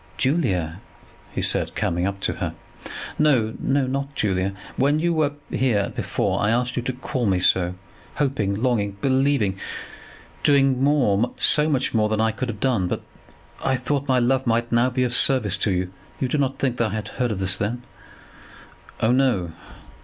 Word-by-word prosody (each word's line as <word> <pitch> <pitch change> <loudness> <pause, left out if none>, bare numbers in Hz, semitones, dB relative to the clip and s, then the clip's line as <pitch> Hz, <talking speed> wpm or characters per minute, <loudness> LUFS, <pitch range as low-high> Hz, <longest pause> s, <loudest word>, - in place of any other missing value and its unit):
"Julia," 95 - 0 0.5
he - - -3
said, - - +1
coming 90 +2 0
up 100 0 -4
to - - 0
her. - - -2 0.6
"No; 125 -8 +3
not 140 0 -1
Julia. 95 -4 0 0.2
When 145 +3 +2
you 170 +2 +1
were 155 -3 +1 0.2
here 110 -7 +1
before - - -1
I 105 - +2
asked 120 +1 0
you - - 0
to 130 +2 -3
call 125 -1 -2
me 95 -2 +2
so, 90 0 +2 0.4
hoping, 130 -9 0
longing, 105 -4 0
believing, 130 -6 +1 0.8
doing 135 -2 +3
more, 125 -6 +2
so 150 +1 +3
much 135 -3 0
more 110 -2 +2
than 110 0 0
I 110 0 +2
could 120 +3 -4
have 105 -2 -5
done, 120 -9 +1
but - - -3 0.6
that - - -3
I 135 - +3
thought 140 +2 -2
my 130 -2 +3
love 130 +1 +1
might 115 +1 +1
now 120 +2 +3
be 130 0 0
of 125 -1 -1
service 125 -7 +3
to 100 - 0
you. 90 0 -1 0.3
You 130 - 0
do 145 +4 -1
not 135 -1 0
think 125 -3 -1
that 115 -2 +1
I - - -3
had 110 - -4
heard 125 -1 -2
of 105 - -2
this 95 0 +2
then?" 115 +5 -3 1.2
"Oh, 110 - +3
no." 125 -10 +2
125 Hz, 185 wpm, -23 LUFS, 105-135 Hz, 1.2 s, No